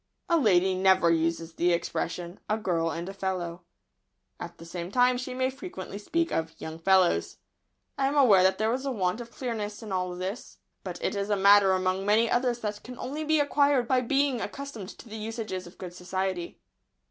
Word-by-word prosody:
A 340 Hz, -, +4 dB
lady 190 Hz, -, +4 dB
never 185 Hz, -2 st, +4 dB
uses 165 Hz, 0 st, 0 dB
the 175 Hz, +2 st, +2 dB
expression 170 Hz, +1 st, -3 dB
"A 215 Hz, -, +2 dB
girl 170 Hz, -6 st, 0 dB
and 170 Hz, +2 st, -4 dB
a 195 Hz, -, -6 dB
fellow." 180 Hz, -3 st, -3 dB, 0.8 s
At 170 Hz, 0 st, -8 dB
the 165 Hz, -, -11 dB
same 170 Hz, +1 st, -6 dB
time 250 Hz, +3 st, +4 dB
she 250 Hz, 0 st, -5 dB
may 260 Hz, 0 st, 0 dB
frequently 270 Hz, -, -8 dB
speak 335 Hz, +10 st, -1 dB
of 160 Hz, 0 st, -3 dB
"young 160 Hz, +1 st, -7 dB
fellows." 185 Hz, 0 st, +3 dB, 0.6 s
I 270 Hz, -, +3 dB
am 280 Hz, -, -1 dB
aware 235 Hz, -10 st, +6 dB
that 190 Hz, +1 st, +3 dB
there 220 Hz, +2 st, +1 dB
is 260 Hz, +2 st, -2 dB
a 275 Hz, -, -1 dB
want 190 Hz, -1 st, -1 dB
of 235 Hz, -, -9 dB
clearness 225 Hz, -4 st, -4 dB
in 215 Hz, -, -7 dB
all 180 Hz, -1 st, -1 dB
this, 190 Hz, +6 st, -6 dB, 0.3 s
but -, -, -6 dB
it -, -, 0 dB
is 200 Hz, 0 st, -2 dB
a 205 Hz, -, +3 dB
matter 200 Hz, 0 st, +6 dB
among 185 Hz, +1 st, 0 dB
many 215 Hz, +3 st, +3 dB
others 245 Hz, -1 st, +1 dB
that 210 Hz, -1 st, -4 dB
can 250 Hz, 0 st, -9 dB
only 285 Hz, +5 st, -4 dB
be 310 Hz, 0 st, +2 dB
acquired 285 Hz, -3 st, +3 dB
by 260 Hz, -2 st, +3 dB
being 270 Hz, -1 st, +1 dB
accustomed 275 Hz, -9 st, -6 dB
to -, -, -12 dB
the 220 Hz, 0 st, -7 dB
usages 215 Hz, -4 st, -5 dB
of 175 Hz, -, -15 dB
good 180 Hz, -2 st, -8 dB
society. 185 Hz, -1 st, -3 dB
200 Hz, 200 wpm, -28 LUFS, 180-250 Hz, 0.8 s, aware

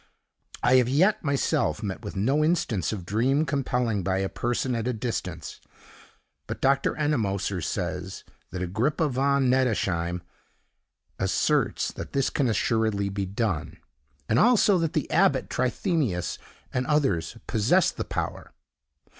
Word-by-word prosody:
I 125 Hz, +1 st, +5 dB
have 125 Hz, -1 st, +3 dB
yet, 190 Hz, +11 st, +3 dB
myself, 140 Hz, -3 st, 0 dB
met 100 Hz, -1 st, -4 dB
with 105 Hz, -, -6 dB
no 135 Hz, +10 st, +2 dB
instance 150 Hz, -, 0 dB
of 100 Hz, -5 st, -5 dB
dream 130 Hz, -, +1 dB
compelling 125 Hz, -7 st, 0 dB
by 95 Hz, +1 st, 0 dB
a 95 Hz, 0 st, -1 dB
person 120 Hz, +2 st, -1 dB
at 115 Hz, 0 st, -2 dB
a 125 Hz, -, 0 dB
distance; 95 Hz, -, -5 dB, 0.9 s
but -, -, -5 dB
Dr. 135 Hz, 0 st, +2 dB
Ennemoser 100 Hz, -, -1 dB
says 90 Hz, +2 st, -4 dB, 0.3 s
that 90 Hz, -1 st, -4 dB
Agrippa 130 Hz, -, 0 dB
von 135 Hz, +1 st, +2 dB
Nettesheim 95 Hz, -9 st, 0 dB, 1.0 s
asserts 95 Hz, 0 st, +1 dB
that -, -, -8 dB
this 135 Hz, -2 st, +1 dB
can 135 Hz, -4 st, +1 dB
assuredly 110 Hz, -2 st, +1 dB
be 100 Hz, -1 st, -3 dB
done, 100 Hz, -4 st, -2 dB, 0.5 s
and 110 Hz, -, +2 dB
also 215 Hz, -5 st, +5 dB
that 165 Hz, -2 st, -1 dB
the -, -, -1 dB
abbot -, -, +2 dB
Trithemius 130 Hz, -, -1 dB, 0.3 s
and 125 Hz, 0 st, -1 dB
others 115 Hz, -, +1 dB
possessed 125 Hz, -, +2 dB
the -, -, -1 dB
power. -, -, -5 dB
120 Hz, 135 wpm, -26 LUFS, 95-140 Hz, 1.0 s, I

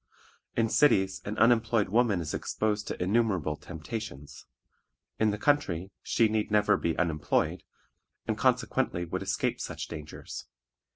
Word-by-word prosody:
In 115 Hz, -, +2 dB
cities 95 Hz, -8 st, +3 dB
an 105 Hz, +2 st, -4 dB
unemployed 115 Hz, -2 st, +3 dB
woman 110 Hz, -4 st, +2 dB
is 80 Hz, -, -4 dB
exposed 105 Hz, -1 st, -1 dB
to -, -, -4 dB
innumerable 95 Hz, -6 st, +1 dB
temptations; 80 Hz, -, -7 dB, 0.7 s
in 110 Hz, -, +4 dB
the 105 Hz, -, -1 dB
country 95 Hz, -, +1 dB
she 115 Hz, -, +2 dB
need 110 Hz, 0 st, -1 dB
never 105 Hz, -1 st, +4 dB
be 80 Hz, -, -1 dB
unemployed, 80 Hz, -4 st, 0 dB, 0.6 s
and -, -, 0 dB
consequently 85 Hz, 0 st, +1 dB
would 95 Hz, +3 st, -4 dB
escape 95 Hz, 0 st, -1 dB
such -, -, -5 dB
dangers. 75 Hz, -2 st, -8 dB
100 Hz, 130 wpm, -29 LUFS, 85-110 Hz, 0.7 s, in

